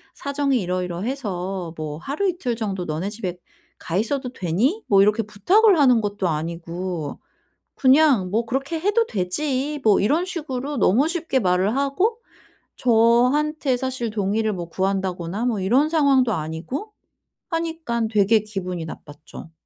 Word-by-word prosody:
사정이 280 -4 0
이러이러해서 180 - -3
뭐 155 -1 -5
"하루 295 - -1
이틀 290 -10 -2
정도 195 -5 -3
너네 160 +5 -3
집에 190 -5 -5 0.4
가 170 - -3
있어도 250 +4 -1
되니?" 240 - 0
뭐 195 -1 +5
이렇게 210 +3 +3
부탁을 355 - +3
하는 250 -5 +5
것도 200 -3 -2
아니고 165 0 -4 0.6
그냥 265 -8 +4
뭐 225 +3 0
"그렇게 275 +6 -2
해도 415 +5 +2
되지." 270 +9 -2
뭐 210 -3 +5
이런 305 - +1
식으로 290 -5 -4
너무 245 +11 +3
쉽게 330 -6 -1
말을 190 +5 +1
하고 365 +12 0 0.6
저한테 250 +4 +3
사실 255 -3 -3
동의를 215 +1 0
뭐 175 -3 -5
구한다거나 190 +2 -2
뭐 225 -5 0
이런 260 +11 +3
상황도 275 -7 +3
아니고 165 - -5 0.6
하니깐 320 -9 -2
되게 215 0 +3
기분이 185 -5 -4
나빴죠. 155 +1 -11
225 Hz, 300 characters per minute, -22 LUFS, 185-280 Hz, 0.6 s, 뭐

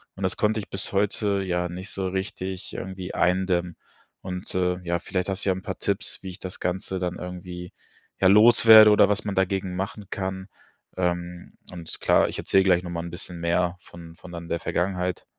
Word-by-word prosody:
und 95 - -11
das 95 - -1
konnte 110 +1 +1
ich 100 - -8
bis 95 - -4
heute 100 0 +1
ja 90 -1 -1
nicht 90 +3 -7
so 95 -1 -3
richtig 95 0 -4
irgendwie 95 -1 -6
eindämmen. 90 -1 +1 0.4
Und, 90 -1 -6
äh, 90 -1 +1
ja, 85 0 -1
vielleicht 90 +1 -3
hast 95 +1 -3
du - - +2
ja 95 - +2
'n 95 - -7
paar - - -5
Tipps, - - -3
wie 95 - -7
ich 90 - -10
das 95 -1 -7
Ganze 95 +1 -2
dann 90 -1 -2
irgendwie, 90 0 -7 0.5
ja, 95 - +5
loswerde 110 +1 +8
oder 105 -1 +6
was 105 0 0
man 100 - -2
dagegen 95 -1 0
machen 100 +2 -4
kann. 95 0 -4 0.5
Ähm. 90 -1 -3 0.2
Und 85 -3 -8
klar, - - +4
ich - - -6
erzähl 95 - +3
gleich 90 -2 +3
noch 85 - -6
mal 85 -1 -3
'n 85 - -6
bisschen 85 0 -7
mehr 85 +1 0
von 85 -1 -13
von 90 - -12
dann 85 -1 -8
der 85 - -1
Vergangenheit. 90 +2 -2
90 Hz, 205 wpm, -25 LUFS, 90-95 Hz, 0.5 s, loswerde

